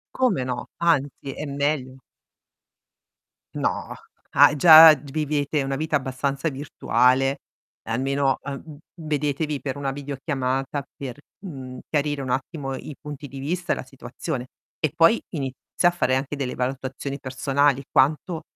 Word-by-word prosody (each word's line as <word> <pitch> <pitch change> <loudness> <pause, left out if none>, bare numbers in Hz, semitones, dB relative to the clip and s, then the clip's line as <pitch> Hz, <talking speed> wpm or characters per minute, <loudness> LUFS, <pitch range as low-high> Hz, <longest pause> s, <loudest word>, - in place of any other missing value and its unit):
Come 250 - +2
no. 125 -1 -4
Anzi 145 -5 0
è 150 - -5
meglio. 140 -2 -2 1.5
No, - - -2 0.4
ah - - +6
già 160 +1 +10
g 140 0 -12
vivete 150 0 0
una 135 0 -2
vita 155 +1 -1
abbastanza 135 +3 -2
virtuale 135 -1 +1 0.5
almeno, 135 +3 0
uhm, 145 +2 -8 0.2
vedetevi 150 -2 -2
per 135 0 -4
una 140 -1 -2
videochiamata 135 -1 -3
per, 135 -1 -7 0.3
mhmm, 130 -6 -8
chiarire 145 -1 -1
un 130 - -5
attimo 135 +1 -3
i 145 +1 -8
punti 150 -1 -8
di 135 +1 -10
vista 175 +5 -1
e - - -2
la - - -6
situazione 130 +1 -6 0.3
e 155 - 0
poi 165 +7 +5
inizia 135 -3 -4 0.3
a - - -3
fare 130 -7 +1
anche 135 +2 -2
delle 135 -3 -3
valutazioni 135 +2 -4
personali. 140 +1 +1
Quanto 155 +5 +2
140 Hz, 135 wpm, -24 LUFS, 135-150 Hz, 1.5 s, già